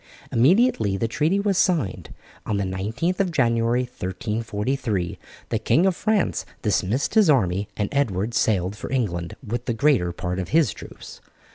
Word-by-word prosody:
Immediately 125 - +3
the 115 - 0
treaty 155 - +1
was 200 -2 +1
signed, 160 - 0 0.3
on 105 - -1
the 100 - 0
19th 110 - -2
of 190 -3 +1
January, 120 -3 +2
1343, 105 -2 -3 0.3
the - - 0
King 170 - +3
of 190 -2 +2
France 215 0 0 0.2
dismissed 115 +10 0
his 215 -6 +5
army, 100 -8 +2
and 105 - 0
Edward 115 -6 0
sailed 100 -4 +1
for 105 - -7
England 100 -7 -2
with 120 +3 -4
the 120 - -1
greater 115 -9 +2
part 90 +1 -4
of 90 - -4
his 155 -7 +3
troops. - - -11
115 Hz, 155 wpm, -23 LUFS, 100-150 Hz, 0.3 s, his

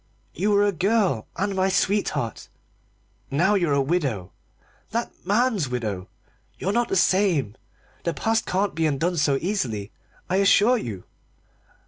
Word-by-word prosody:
"You 200 +6 0
were 205 0 +4
a 205 - +2
girl, 190 - +1
and 200 +2 -1
my 190 0 +2
sweetheart; 180 - -1 0.8
now 175 +9 +2
you're 175 -7 +1
a 140 -1 +2
widow 135 - -1 0.6
that 235 +2 -2 0.2
man's 210 - +2
widow! 105 -7 -3 0.5
You're 195 - -1
not 240 +1 +1
the - - 0
same. 175 - +2 0.5
The 170 - -2
past 225 0 0
can't 195 +2 0
be 160 0 +1
undone 165 +5 0
so 145 -2 +2
easily, 120 - -2 0.4
I 185 - +1
assure 205 +5 +4
you." 100 - -6
180 Hz, 140 wpm, -24 LUFS, 135-205 Hz, 0.8 s, were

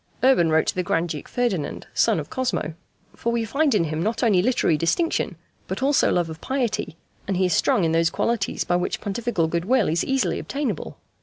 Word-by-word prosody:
Urban 255 -11 +5
wrote 160 0 +3
to - - 0
the 185 - -1
Grand 175 -1 0
Duke 150 -2 -5
Ferdinand, 230 -11 -2
son - - +3
of - - -7
Cosmo: 250 -11 -2 0.4
"For 235 - -2
We 235 -1 0
find 280 +3 +1
in 190 - +3
him 155 0 -2
not 220 +7 -1
only 205 -6 +4
literary 210 -7 +2
distinction 165 - 0 0.3
but - - -3
also 280 +1 +3
love 175 -2 +1
of 160 -1 -9
piety, 245 - -2 0.3
and 195 -2 0
he 185 - +2
is 180 - +1
strong 190 - +2
in 165 - +2
those 165 0 +3
qualities 230 -1 -1
by 175 - +1
which 180 - -2
Pontifical 205 -4 -1
good 170 +1 -2
will 250 -2 +3
is 165 +2 +1
easily 270 -1 0
obtainable. 275 - -4
195 Hz, 210 wpm, -23 LUFS, 165-245 Hz, 0.4 s, Urban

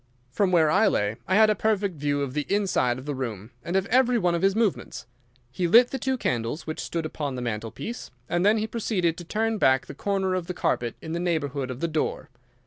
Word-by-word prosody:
"From 195 +6 +1
where 160 -4 +4
I - - +4
lay 105 +2 0
I 185 - +2
had 215 +1 +6
a - - +4
perfect 205 -4 0
view 145 0 0
of 130 -2 -4
the 150 0 -2
inside 190 -12 +1
of 130 - -9
the 145 - -2
room 115 -5 -5
and 175 - -3
of 190 0 +2
every 250 +1 +3
one 180 -5 +1
of 170 - -1
his 195 0 +3
movements. 220 -4 -1 0.5
He 175 +7 -1
lit 235 +7 +6
the 270 - -3
two 265 +1 -1
candles 120 - -2
which 155 - -5
stood 165 -2 -3
upon 145 -3 -4
the 125 - -4
mantelpiece, 115 - -5 0.2
and 175 +5 0
then 210 +3 +4
he 215 - 0
proceeded 205 -7 -1
to - - -7
turn 220 +5 -1
back 130 -4 +3
the - - -9
corner 195 -2 -1
of 180 -2 -2
the 180 - -4
carpet 120 -8 -1
in 160 - -6
the 170 - -2
neighbourhood 145 -6 -1
of 125 +1 -6
the 170 - +1
door. 155 -4 -2
170 Hz, 235 wpm, -25 LUFS, 140-205 Hz, 0.5 s, had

